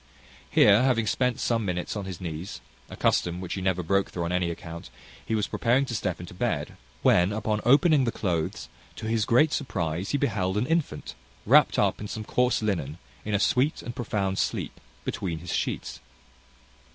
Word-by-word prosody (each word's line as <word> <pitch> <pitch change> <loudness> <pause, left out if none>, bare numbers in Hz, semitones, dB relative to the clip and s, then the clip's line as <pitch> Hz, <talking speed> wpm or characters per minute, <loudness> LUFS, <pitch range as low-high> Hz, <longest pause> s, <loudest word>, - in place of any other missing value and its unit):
Here, 105 - +6
having 125 -4 +2
spent 125 +3 0
some 115 -2 0
minutes 90 -1 -3
on 100 -2 -4
his 95 -3 -6
knees 85 +1 -6 0.3
a - - -8
custom 85 0 +1
which 90 -1 -5
he 95 - -4
never 95 -1 0
broke 100 +3 +1
through 85 - -4
on 85 - -2
any 90 -1 +1
account 85 0 -7 0.3
he 110 - -1
was 105 -2 +1
preparing 125 +3 +1
to 125 - -5
step 95 -5 -2
into 90 0 -9
bed, 90 - -2 0.3
when, 90 +3 +4
upon 105 0 -1
opening 145 +2 +5
the 115 - 0
cloathes, 85 -8 -2 0.3
to - - -7
his 110 -1 +1
great 145 +8 +4
surprize 90 - -2
he 145 - +1
beheld 100 -9 0
an 110 - +1
infant, 165 +1 -1 0.3
wrapt - - +5
up - - +1
in 105 - -4
some 110 +1 -5
coarse 125 -1 +1
linen, 85 -8 -1 0.3
in 105 -1 -1
a - - +2
sweet 130 +7 +1
and 120 - -6
profound 100 -5 -1
sleep, - - -2 0.3
between 85 -4 -3
his 85 +1 -6
sheets. - - -2
100 Hz, 190 wpm, -27 LUFS, 90-120 Hz, 0.3 s, Here